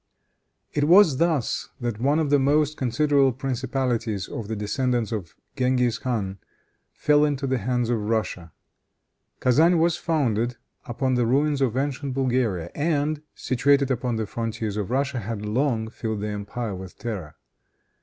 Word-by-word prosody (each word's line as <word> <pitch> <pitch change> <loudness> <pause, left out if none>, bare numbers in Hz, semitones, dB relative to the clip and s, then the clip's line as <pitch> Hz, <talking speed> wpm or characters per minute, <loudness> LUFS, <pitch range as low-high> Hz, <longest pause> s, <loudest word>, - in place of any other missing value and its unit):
It 145 -1 +1
was 170 -4 +6
thus 160 -7 0
that 120 -3 -3
one 140 +4 +3
of 155 -3 0
the 145 - +5
most 150 +2 +2
considerable 140 +1 +2
principalities 125 -5 -2
of 115 -4 -6
the 110 - -3
descendants 120 +2 -1
of 100 -7 -5 0.2
Genghis 125 -3 +1
Khan 100 -6 -2 0.5
fell 150 0 +3
into 145 -2 0
the 130 -1 0
hands 125 +2 0
of 115 - +1
Russia. 100 -7 -2 0.9
Kezan 160 +8 +4
was 170 +1 +2
founded 120 -7 0 0.3
upon 130 +1 -1
the 120 -2 +2
ruins 140 +3 +2
of 125 -2 +1
ancient 140 -1 -2
Bulgaria, 120 -10 0
and, 150 -1 0
situated 135 +2 +2
upon 125 -1 -1
the 110 -1 -1
frontiers 110 -1 -3
of 105 -2 -3
Russia, 135 0 0
had 110 -1 -5
long 115 0 0
filled 110 -2 -4
the 105 - -2
empire 105 +2 -4
with 95 -1 -9
terror. 95 -11 -5
125 Hz, 150 wpm, -24 LUFS, 110-140 Hz, 0.9 s, was